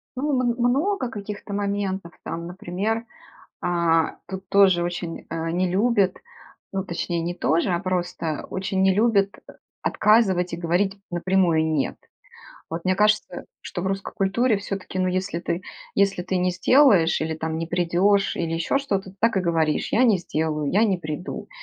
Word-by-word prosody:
Ну, 290 +3 -1
мн 245 -2 +1
много 260 +4 +1
каких-то 205 -2 -7
моментов 200 -3 -2
там, 170 +1 -5
например, 190 +5 -2 0.6
а, 170 -2 +1
тут 190 0 -7
тоже 190 -3 +5
очень, 175 -1 -5
а, 165 0 -3
не 180 +1 0
любят, 200 -1 +2 0.5
ну 190 0 -2
точнее 170 -1 -2
не 175 +1 -3
тоже, 170 +3 +1
а 175 0 0
просто 175 -4 -2
очень 190 0 -2
не 190 -1 +4
любят, 205 -2 +3 0.2
э, - - -10 0.3
отказывать 195 -5 +3
и 170 - -2
говорить 180 +4 0
напрямую 175 -2 +2
"Нет". 145 -3 -1 0.7
Вот 165 +2 -4
мне 185 0 +2
кажется, 210 -2 +1 0.2
что 175 - -5
в - - -2
русской 195 0 -3
культуре 215 +3 +2
все-таки, 195 -2 -5
ну, 185 0 +2
если 185 -1 -1
ты 175 +1 -3 0.3
если 195 -2 +2
ты 185 +1 -2
не 180 0 +2
сделаешь 195 - +4
или 160 0 -1
там 160 0 -3
не 165 - -3
придешь 180 +4 +2
или 165 -1 -2
еще 165 +11 +1
что-то, 195 -9 -3
так 230 -2 +2
и - - +3
говоришь: 165 -3 0
"Я 245 - +4
не 215 -6 +4
сделаю, 155 -3 -2
я 215 +4 +4
не 195 -4 +2
приду". 155 +2 -6
185 Hz, 165 wpm, -24 LUFS, 170-200 Hz, 0.7 s, тоже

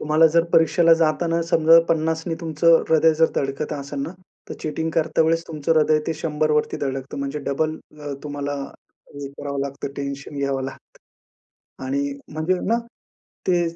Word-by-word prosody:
तुम्हाला 155 +2 +4
जर 170 0 +5
परीक्षेला 165 +1 +5
जाताना 165 +1 +1
समजा 165 +1 +6
50 160 0 0
ने 165 - -1
तुमचं 165 0 +3
हृदय 160 0 +5
जर 160 +1 +3
धडकत 135 +2 -2
असेल 140 -1 -5
ना, 145 +4 -3 0.4
तर - - -5
चीटिंग 160 +1 -2
करता 160 0 +2
वेळेस 165 +1 +2
तुमचं 155 -1 -1
हृदय 155 0 +4
ते 165 - -1
100 155 -1 -1
वरती 150 0 +1
धडकतं. 135 +1 -5
म्हणजे 140 +1 -3
डबल 155 +3 0 0.2
अ, 145 -1 -5
तुम्हाला 145 -1 -4 0.6
हे 140 -1 -6
करावं 140 0 -5
लागतं 140 0 -4
टेन्शन 140 +1 -5
घ्यावं 140 -1 -1
लागतं. 135 - -10 0.9
आणि 140 +1 0 0.3
म्हणजे 155 +4 0
ना, 230 +1 +3 0.7
ते 175 -1 +3
155 Hz, 160 wpm, -22 LUFS, 140-160 Hz, 0.9 s, समजा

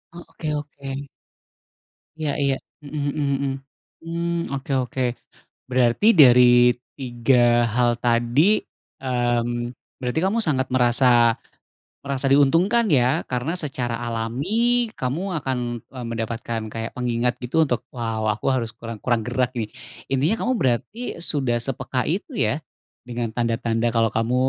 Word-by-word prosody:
E - - -9
oke, 165 -2 -8
oke. 140 -1 -6 1.1
Ya 155 -2 -1 0.2
ya. 135 - +3 0.3
Mhm 145 0 -3
mhm 140 -2 0
-mhm. 140 - 0 0.5
Mmm, 170 0 -2
oke 140 0 -4
oke. 130 +1 -4 0.7
Berarti 125 - +2 0.2
dari 125 -2 +8 0.5
3 125 -1 +1 0.4
hal 120 -1 +3
tadi, 120 +3 +2 0.6
mmm, 120 -1 -1 0.2
berarti 125 +3 -1
kamu 200 +5 +1
sangat 130 -4 +1
merasa 120 -2 +4 0.7
merasa 140 -1 -1
diuntungkan 165 - +4
ya 130 +4 +3
karena 125 +5 -1
secara 130 -7 -3
alami 115 +6 -3 0.5
kamu 130 +6 -2 0.2
akan, 130 -2 -2 0.3
e 130 - -12
mendapatkan 115 0 -3
kayak 115 +1 -5
pengingat, 120 0 0
gitu, 160 +6 +2
untuk, 125 -5 -1 0.2
"Wow, 115 -2 -2
aku 105 0 -2
harus 115 -3 -2
kurang 115 -2 -8
kurang 120 -3 0
gerak 125 +1 -1
nih", 110 -2 -3 0.4
intinya 145 +11 +2
kamu 255 - +1
berarti 135 - -1
sudah 140 -8 +1
sepeka 125 +1 -2
itu 185 - -2
ya, 150 - 0 0.5
dengan 120 -2 -3
tanda-tanda 115 0 0
kalau 115 -1 +1
kamu, 115 +2 0
125 Hz, 130 wpm, -23 LUFS, 120-140 Hz, 1.1 s, dari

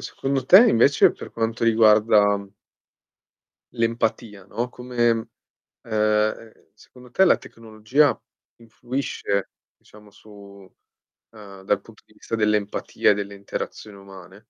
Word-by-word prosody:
secondo 135 -1 -4
te 195 - +8
invece 135 +5 +4
per - - -11
quanto 115 0 -3
riguarda 105 -2 +4 1.3
l'empatia, 115 -3 -3
no, 115 +5 -4
come 120 -2 -1 0.5
ehm, 110 0 -1 0.2
secondo 125 -1 -18
te 190 +10 +3
la 185 - +4
tecnologia 115 +6 -1 0.4
influisce, 115 -3 -4 0.3
diciamo, 105 -1 -19
su 100 -2 -16 0.6
ehm, 100 -3 -13
dal 100 +1 0
punto 110 +2 -19
di - - -26
vista 115 - -6
dell'empatia 105 -2 0
e - - +4
delle 100 0 -6
interazioni 100 +1 -8
umane? 95 0 -14
110 Hz, 110 wpm, -22 LUFS, 100-115 Hz, 1.3 s, te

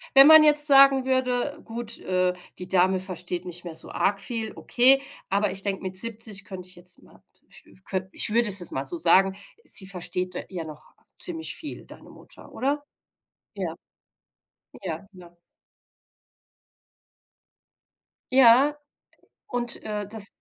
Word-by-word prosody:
wenn 270 +1 +10
man 315 0 +9
jetzt 295 0 +5
sagen 275 -1 +6
würde: 260 +2 -1
„Gut, 230 0 -6
äh, 185 0 0 0.3
die 180 - -7
Dame 185 0 +2
versteht 180 -1 -4
nicht 175 0 -8
mehr 170 -2 -8
so - - -10
arg 200 0 0
viel“, 220 +1 -5
okay, 265 +3 +4 0.3
aber 200 +1 +1
ich 195 +1 -5
denke, 195 -2 -3
mit 185 0 -6
70 215 -1 -4
könnte 185 -1 -9
ich 185 - -13
jetzt 180 0 -9
mal - - -21 0.2
ich - - -13
ich 190 - -20
könnt 190 -1 -4
ich 210 - +1
würde 235 -2 +2
es 200 - +6
jetzt 175 - -7
mal 135 +1 -3
so 170 - -2
sagen: 190 +4 +3 0.3
Sie 190 - -2
versteht 180 -1 -4
d - - -6
ja 175 -4 -6
noch 155 -1 -12 0.3
ziemlich 325 -3 -4
viel, 300 - -8
deine - - -15
Mutter, - - -16
oder? 285 +2 -1 0.7
Ja. - - -3 1.1
Ja, 175 0 -5
ja. 175 -2 -16 3.0
Ja, 265 +3 +6 0.7
und, 240 -1 -4
äh, 210 -1 -4
das 205 0 -3
200 Hz, 155 wpm, -25 LUFS, 180-245 Hz, 3.0 s, wenn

